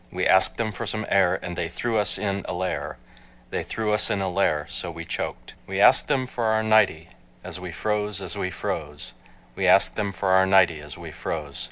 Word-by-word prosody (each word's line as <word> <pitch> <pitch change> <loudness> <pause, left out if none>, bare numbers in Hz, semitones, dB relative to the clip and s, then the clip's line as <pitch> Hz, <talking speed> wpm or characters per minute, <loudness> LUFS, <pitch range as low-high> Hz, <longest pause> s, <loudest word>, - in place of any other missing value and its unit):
We - - -2
asked 95 - +4
them 115 -2 -1
for 100 - -6
some 110 0 -3
air 95 -2 +3
And 90 - -5
they 85 -1 -3
threw 115 +5 -1
us 105 -3 +3
in 100 -1 -2
a - - -2
lair, 90 -7 -3 0.5
They - - -1
threw 110 -1 -2
us 105 - +2
in 100 - 0
a 95 -1 -1
lair, 80 -5 +1
so 85 +2 -4
we 85 0 -7
choked. - - -5
We - - -3
asked - - +6
them 135 -3 +1
for 120 -2 -4
our 110 0 +2
nightie, 100 -7 +3 0.3
As 90 -1 -7
we 90 -1 -7
froze, 105 +2 -2
as 95 -3 -6
we 90 - -2
froze, 75 -5 -5 0.4
We - - 0
asked - - +5
them 105 -2 -1
for 95 0 -2
our 95 0 +5
nightie 95 -5 +4
As 75 -2 -9
we - - -9
froze. 75 -4 -5
95 Hz, 220 wpm, -24 LUFS, 85-105 Hz, 0.5 s, asked